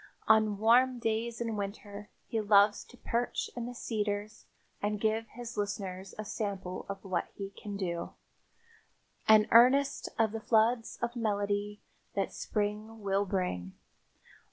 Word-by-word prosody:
On 215 -2 +4
warm 245 +4 +4
days 230 0 -1
in 230 -2 -2
winter 205 0 -6 0.2
he 225 - -1
loves 205 0 +5
to 250 - -17
perch 235 +1 -2
in 240 -1 -4
the 245 - -7
cedars 210 -1 -3 0.3
and 210 0 -1
give 220 +1 0
his 240 +1 -8
listeners 195 -2 -4
a 215 - -5
sample 195 -3 -4
of 195 -1 -5
what 185 -3 -1
he 195 -1 -6
can 200 0 -7
do, 170 -3 -3 1.1
an 215 -1 +7
earnest 270 +4 +5
of 225 -2 +3
the 225 0 -5
floods 225 +1 +2
of 235 +1 -1
melody 205 -2 -1 0.3
that - - -1
spring 215 +1 -3
will 200 0 +1
bring. 95 - -2
210 Hz, 140 wpm, -31 LUFS, 200-225 Hz, 1.1 s, an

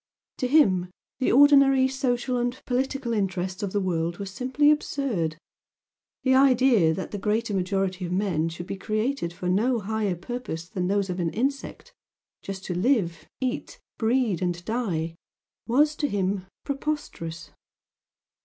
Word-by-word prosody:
To 255 - 0
him 195 - +4 0.3
the 260 - +2
ordinary 275 -1 +6
social 255 -2 -1
and 245 +1 -2
political 260 -1 -1
interests 190 -2 -2
of 200 -2 -2
the 205 - +1
world 170 -2 -1
were 200 - -5
simply 260 +9 +2
absurd. 240 - -1 0.9
The 260 - +3
idea 255 -9 +5
that 185 +4 -4
the 205 - -4
greater 215 +2 0
majority 190 0 -1
of 175 - -5
men 180 -4 0
should 170 +1 -7
be 195 - -5
created 215 0 -1
for 180 +1 -6
no 225 +7 +2
higher 210 -2 -1
purpose 175 -3 -6
than 185 -2 -2
those 200 -1 0
of 180 - -4
an 170 -2 0
insect, 270 - -3 0.5
just 195 -1 -7
to 180 - -2
live, 180 - 0
eat, 255 0 -3 0.2
breed, 225 -5 +1
and 175 -1 -2
die, 185 -9 -2 0.5
was 295 +6 +3
to 290 - 0
him 190 -3 -1 0.2
preposterous. 275 - -4
205 Hz, 145 wpm, -26 LUFS, 180-260 Hz, 0.9 s, ordinary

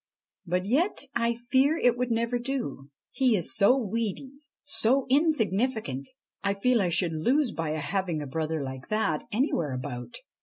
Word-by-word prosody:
But 180 +2 0
yet 285 - +1
I 235 0 +1
fear 260 +6 +2
it 245 -6 +3
would 250 0 -1
never 235 +1 0
do. 240 - -4 0.2
He 255 -3 +3
is 165 -9 0
so 245 +7 +5
weedy, 230 +2 -3 0.3
so 260 0 +2
insignificant. 225 - +1 0.3
I 200 0 +1
feel 240 +3 +2
I 180 - +1
should 170 0 +1
lose 245 - +1
by 165 -4 -3
having 175 +1 -1
a 145 - -4
brother 155 +2 -2
like 130 -1 -7
that 215 -8 0
anywhere 205 - 0
about. 125 - -6
220 Hz, 155 wpm, -27 LUFS, 160-250 Hz, 0.3 s, so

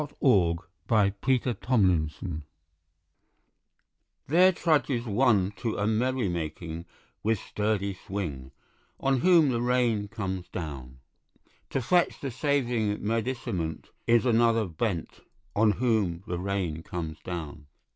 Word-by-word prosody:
Thomas 150 -1 -6 0.8
Hardy 105 -3 +4 0.2
An 130 -2 +4
Autumn 120 -3 +2
Rain 80 -4 +2
Scene 80 0 -6 1.8
THERE 180 +6 +5
trudges 150 -8 +1
one 105 -4 +3
to 115 +3 -2
a 100 - 0
merry 120 +2 +1
making 85 0 -4 0.4
With 110 +1 +1
sturdy 105 -1 -1
swing, 85 -9 -5 0.5
On 135 -1 +2
whom 170 -2 +5
the 120 -1 0
rain 120 -4 +1
comes 95 -4 -4
down. 65 -6 -7 0.7
To 135 - -1
fetch 175 +6 +2
the 135 - -4
saving 120 -7 0
medicament 110 -8 -2 0.2
Is 120 +1 +4
another 115 -2 +3
bent, 90 0 -3 0.4
On 105 0 +4
whom 105 -8 0
the 90 -4 -3
rain 90 -4 -2
comes 80 -2 -5
down. 80 -4 -6
105 Hz, 120 wpm, -28 LUFS, 90-125 Hz, 1.8 s, THERE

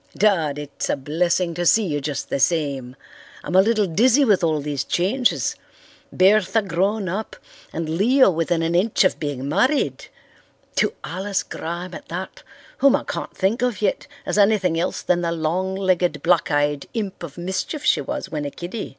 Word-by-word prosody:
"Dad, 170 -8 +2
it's 145 -1 -5
a - - +2
blessing 170 +5 0
to 175 +1 -3
see 215 +5 +4
you 145 -5 -2
just 145 0 -4
the - - 0
same. 140 -5 0 0.5
I'm - - -5
a 190 - +8
little 215 0 +2
dizzy 240 - +3
with 205 -6 +3
all 160 -2 +2
these 145 -1 -3
changes. 210 - 0 0.6
Bertha 205 +3 +3
grown 195 +3 0
up 200 +5 -4 0.4
and 165 0 -4
Leo 205 - +4
within 165 0 0
an 165 +1 0
inch 195 +6 +3
of 185 - +1
being 140 -3 -4
married! 255 - +1 0.7
To - - +2
Alice 195 +2 -2
Graham 170 +2 -6
at - - -9
that, 180 +3 -6 0.4
whom 275 -1 +5
I - - -2
can't - - -6
think 200 +5 +1
of 250 -3 0
yet 205 -2 -1 0.2
as - - 0
anything 200 -5 +3
else 175 - -2
than 175 -1 +1
the 170 -1 -1
long 170 +4 -1
legged, 185 -2 0
black 170 -2 +3
eyed 145 -1 0
imp 205 -4 -4
of 170 -3 -8
mischief 190 - -3
she - - +3
was 295 -1 -4
when 150 -2 -4
a - - -2
kiddy. 175 +9 -6
180 Hz, 180 wpm, -22 LUFS, 160-205 Hz, 0.7 s, a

